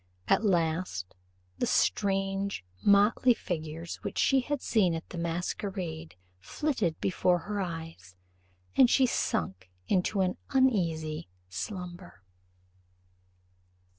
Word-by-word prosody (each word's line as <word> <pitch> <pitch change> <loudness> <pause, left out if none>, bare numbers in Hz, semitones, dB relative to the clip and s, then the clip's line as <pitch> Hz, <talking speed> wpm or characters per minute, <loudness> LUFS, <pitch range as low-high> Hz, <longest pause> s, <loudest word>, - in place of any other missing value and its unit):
At - - +3
last, 165 - 0 0.5
the - - +1
strange 195 - +1 0.2
motley 205 +5 +5
figures 165 -2 -5
which - - -6
she 270 - +4
had 290 +2 -2
seen 190 -9 +2
at 165 - -6
the 180 - -7
masquerade 170 - -3 0.2
flitted 210 - -1
before 180 -1 +2
her 205 +3 -3
eyes, 165 - -6 0.6
and 250 - +7
she 265 - +5
sunk 95 - -1 0.2
into 190 +1 +1
an 185 -1 0
uneasy 170 - +1 0.2
slumber. 175 - -7
180 Hz, 105 wpm, -29 LUFS, 160-200 Hz, 0.6 s, and